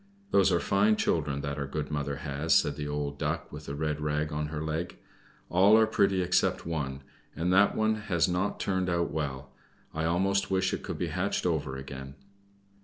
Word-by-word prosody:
"Those 95 -1 +4
are 85 - +3
fine 105 +4 +3
children 70 -8 0
that 70 +1 -4
our 70 - -2
good 75 +2 -4
mother 70 -1 -2
has," 70 +3 0
said 75 - +3
the 75 0 -4
old 75 -1 -3
Duck - - -2
with 75 0 -9
the 70 - -4
red 75 0 -2
rag 75 0 -1
on 75 0 -2
her 75 0 -4
leg. 80 +2 -3 0.5
"All 100 +5 +5
are 110 - +6
pretty 100 -3 +2
except 90 - +1
one, 70 -5 -3 0.3
and 90 +2 0
that 100 +2 +5 0.3
has 85 -6 +2
not 90 +3 -1
turned 95 -2 0
out 85 -1 0
well; 70 -4 -4 0.4
I 80 +1 -1
almost 95 +4 +1
wish 95 -1 +1
it - - -2
could - - -5
be 85 - -2
hatched 95 +2 -1
over 75 -6 -1
again." 70 0 -8
80 Hz, 190 wpm, -29 LUFS, 70-90 Hz, 0.5 s, are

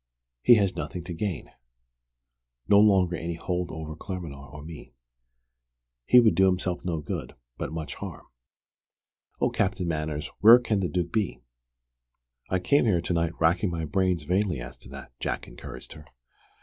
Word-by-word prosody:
He 120 - +7
has 100 -4 +1
nothing 90 - -5
to 85 - -6
gain 90 0 -4 1.2
no 100 0 +6
longer 95 -4 +4
any 85 0 -4
hold 90 +1 -3
over 80 -1 -6
Claremanagh 75 -6 -7
or 75 0 -10
me. 80 -1 -11 1.1
He 125 - +8
would 115 -3 +5
do 95 0 +4
himself 90 -1 -1
no 85 -3 -2
good, - - -5 0.2
but - - -5
much 80 -1 -5
harm. - - -8 1.1
Oh, - - +1
Captain 95 -3 -1
Manners, 75 -1 -3
where 115 +4 +9
can 115 -4 -1
the 90 -2 -1
Duke 85 -2 -2
be?" 85 - -1 1.1
"I 95 - +2
came 140 +10 +2
here 95 -6 +3
to 90 - -2
night 85 0 -1
racking 85 +4 +2
my 85 -2 -3
brains 90 0 0
vainly 90 -1 0
as - - -8
to - - -14
that," 70 -2 -10
Jack - - -3
encouraged 60 +1 -10
her. 75 - -14
85 Hz, 160 wpm, -27 LUFS, 80-95 Hz, 1.2 s, where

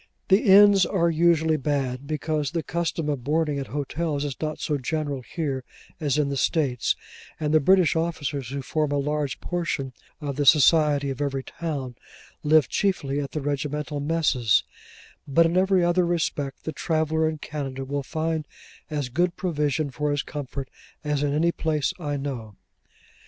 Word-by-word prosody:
The 195 +3 +6
inns 200 -1 +7
are 170 -3 +1
usually 160 -1 +3
bad; 135 -2 -2
because 155 -1 -1
the 165 0 -2
custom 165 -2 -2
of 140 -5 -2
boarding 150 0 0
at 135 - -5
hotels 145 +3 -2
is 140 -3 -3
not 155 -1 -3
so 150 -2 -1
general 145 0 -2
here 135 -1 -3 0.4
as 150 -3 0
in 145 -2 +1
the 140 - -2
States, 130 -4 +1 0.4
and 150 -1 -1
the 155 - +6
British 185 +3 +4
officers, 145 -6 -2
who 140 0 -4
form 150 +2 -1
a 145 - +1
large 145 -1 -1
portion 160 -7 -2 0.3
of 145 -3 -4
the 145 - +1
society 150 -2 +5
of 135 - -6
every 135 -2 -1
town, 145 -7 -5 0.5
live 155 -2 +4
chiefly 145 -8 0
at 140 -1 -3
the 155 - -2
regimental 145 0 -2
messes: 145 -8 +2 0.6
but 165 +4 +4
in 165 +1 +1
every 190 -1 +3
other 175 +1 +3
respect, 155 -5 -2
the 160 - -3
traveller 160 0 0
in 155 - -4
Canada 135 -3 -5
will 140 +1 -2
find 155 +2 -2 0.4
as 145 -4 -2
good 175 +7 0
provision 150 -4 -1
for 150 +3 -2
his 145 -1 0
comfort 140 -2 -6 0.4
as 150 -1 0
in 145 -1 +1
any 160 +4 +2
place 155 -4 -1
I 145 -4 -2
know. 125 -7 -5
150 Hz, 170 wpm, -25 LUFS, 140-160 Hz, 0.6 s, inns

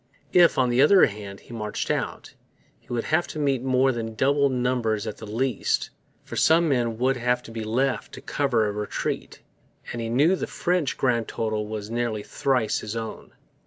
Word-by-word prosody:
If, 175 -1 +6
on 130 -2 +3
the 120 +2 +3
other 185 +7 +7
hand, 100 -2 -7
he - - -13
marched 105 -2 -3
out, - - -3 0.5
he - - -32
would 120 -1 -1
have 165 +3 +1
to - - -7
meet 140 -4 +1
more 130 0 +3
than 115 -2 -4
double 140 +3 +3
numbers 125 -4 0
at 110 - -5
the 110 - -9
least; 125 +5 -1 0.3
for - - -8
some 165 +1 +4
men 120 -5 0
would 130 +2 +1
have 125 0 0
to - - -11
be 115 -1 -5
left 125 +5 -1
to - - -9
cover 125 -6 +1
a 105 - 0
retreat; 105 0 -4 0.5
and 120 - -4
he 115 - -3
knew 145 +10 +4
the - - -4
French 175 -5 -1
grand 120 -4 +1
total 110 -1 -2
was 105 0 -5
nearly 115 -3 -1
thrice 125 -4 0
his 105 +1 -6
own. 115 -1 -6
120 Hz, 195 wpm, -25 LUFS, 110-135 Hz, 0.5 s, other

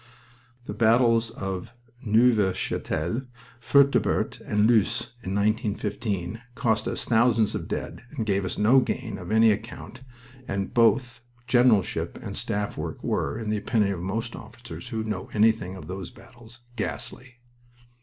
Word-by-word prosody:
The - - -5
battles 115 0 +3
of 95 0 -6 0.3
Neuve 110 -4 +3
Chapelle, 85 +11 -2 0.4
Fertubert, 140 +4 +2
and 105 0 +1
Loos, 115 0 +2
in 95 -2 -4
1915, 105 -2 -1
cost 115 -6 0
us - - -2
thousands 115 -2 +3
of - - -4
dead - - -5
and 120 -6 -4
gave 100 -2 +1
us 95 - -4
no 115 +6 +5
gain 125 -2 -3
of - - -7
any 110 0 +6
account; 110 +4 -6 0.5
and 100 0 -3
both 120 +1 +3 0.2
generalship 120 - +2
and - - -7
staff 105 0 -3
work - - -5
were, 70 - -1
in 110 -2 -3
the 110 - +1
opinion 105 -1 +1
of 85 - -6
most 110 +6 -3
officers 120 +2 -10
who 110 -3 -2
know 105 -4 -4
anything 105 -4 +2
of 80 - -9
those 95 +1 -6
battles, 120 -1 -17
ghastly. 125 +3 -5
110 Hz, 145 wpm, -26 LUFS, 100-120 Hz, 0.5 s, any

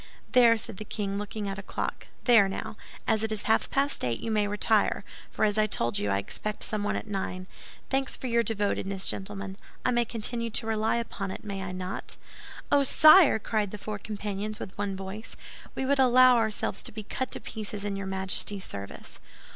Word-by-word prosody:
"There," 235 -3 +6
said 220 -2 -2
the 215 - -5
king, 200 -1 -3
looking 210 0 -4
at 195 0 -4
a - - -4
clock, - - -4 0.2
"there, 225 -6 +6
now, 195 - -5 0.3
as 220 - +2
it 220 0 0
is 215 -1 -2
half 220 - +2
past 280 +1 0
eight, 120 -2 0
you 225 - -3
may 210 -1 +2
retire; 210 +1 +2 0.3
for - - +1
as 210 0 +1
I 215 - +4
told 120 - 0
you, 105 - -1
I 100 - +2
expect 210 - -3
someone 210 -1 0
at - - -3
nine. 190 -3 -3 0.5
Thanks 270 -1 0
for - - -8
your 235 -1 +3
devotedness, 200 -3 -1
gentlemen. 195 0 -3 0.3
I - - +3
may 240 -1 +3
continue 230 +1 -3
to 225 - -2
rely 220 0 +1
upon 225 -4 -3
it, - - -6
may 200 -2 -4
I 190 -1 -4
not?" 185 0 -5 0.5
"Oh, 285 - +6
sire!" 310 +2 +8
cried 215 -1 -1
the 210 - -7
four 210 0 -5
companions, 210 0 -4
with 190 - -7
one 200 -1 -2
voice, 195 +3 -7 0.4
"we 265 - -1
would 280 +1 +2
allow 255 -1 +7
ourselves 220 -4 0
to - - -3
be 215 0 -7
cut 260 +5 -3
to - - -4
pieces 210 -2 -6
in 205 -1 -2
your 195 0 -4
Majesty's 190 +1 -2
service." 100 0 -8
210 Hz, 200 wpm, -28 LUFS, 195-230 Hz, 0.5 s, sire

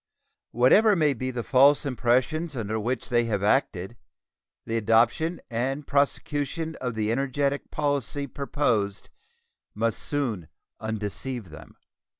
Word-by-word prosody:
Whatever 200 - +5
may 155 -5 +3
be 130 +1 -4
the 120 -2 -4
false 140 +5 +5
impressions 130 +6 0
under 110 -1 -2
which 120 +3 -2
they 120 -1 +2
have 105 -3 -1
acted, 105 -2 0 0.7
the 115 - -3
adoption 115 +10 +2
and 135 +5 -2
prosecution 145 +3 -1
of 125 -3 -3
the 110 0 0
energetic 140 +2 -1
policy 145 -1 -1
proposed 125 -7 -1 0.6
must 115 +1 0
soon 120 - -2 0.3
undeceive 110 -1 -4
them. 75 - -12
125 Hz, 120 wpm, -26 LUFS, 110-145 Hz, 0.7 s, Whatever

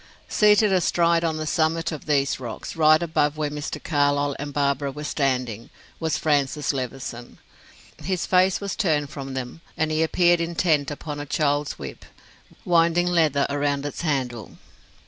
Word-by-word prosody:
Seated 210 -1 +4
astride 170 -2 +2
on 160 -1 0
the 155 - -3
summit 160 +2 0
of 155 -1 -7
these 140 -3 +1
rocks, 120 -4 -7
right 155 0 +5
above 150 -2 0
where 150 -1 -2
Mr. 150 +1 -4
Carlyle 145 -2 +1
and 145 +1 -5
Barbara 140 0 0
were 150 +2 -8
standing 130 -6 -2 0.3
was 160 -2 0
Francis 145 -1 0
Levison. 125 -2 -6 0.7
His 185 -1 -1
face 185 0 +3
was 200 -1 -4
turned 155 -8 0
from 135 -2 -6
them 130 +5 -6 0.2
and 155 0 0
he 155 +1 +1
appeared 175 +1 +3
intent 165 -3 +1
upon 145 0 -6
a 145 - -6
child's 145 0 0
whip, - - -8 0.6
winding 170 0 +3
leather 160 -5 +2
round 145 0 -1
its 145 - -5
handle. 130 -8 -3
150 Hz, 155 wpm, -24 LUFS, 140-165 Hz, 0.7 s, right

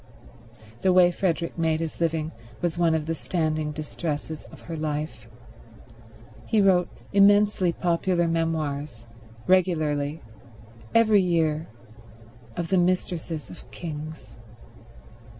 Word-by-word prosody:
The 190 - +4
way 180 -1 +6
Frederick 170 -2 -1
made 160 -1 +1
his 165 -1 -4
living 160 -1 0 0.3
was 175 -1 -1
one 170 -2 +3
of 155 -2 -1
the 165 - -1
standing 155 -3 -1
distresses 155 0 -5
of - - -14
her 165 - -6
life. 150 -7 -4 1.2
He 220 - +2
wrote 185 -3 +4 0.2
immensely 200 -2 +5
popular 175 0 +1
memoirs, 155 -6 -2 0.4
regularly, 155 -5 +1 0.7
every 220 -3 +6
year, 165 -3 +1 0.9
of 170 -1 -2
the 190 - +3
mistresses 175 -5 -1
of - - -13
kings. 155 -1 -7
165 Hz, 110 wpm, -25 LUFS, 155-180 Hz, 1.2 s, way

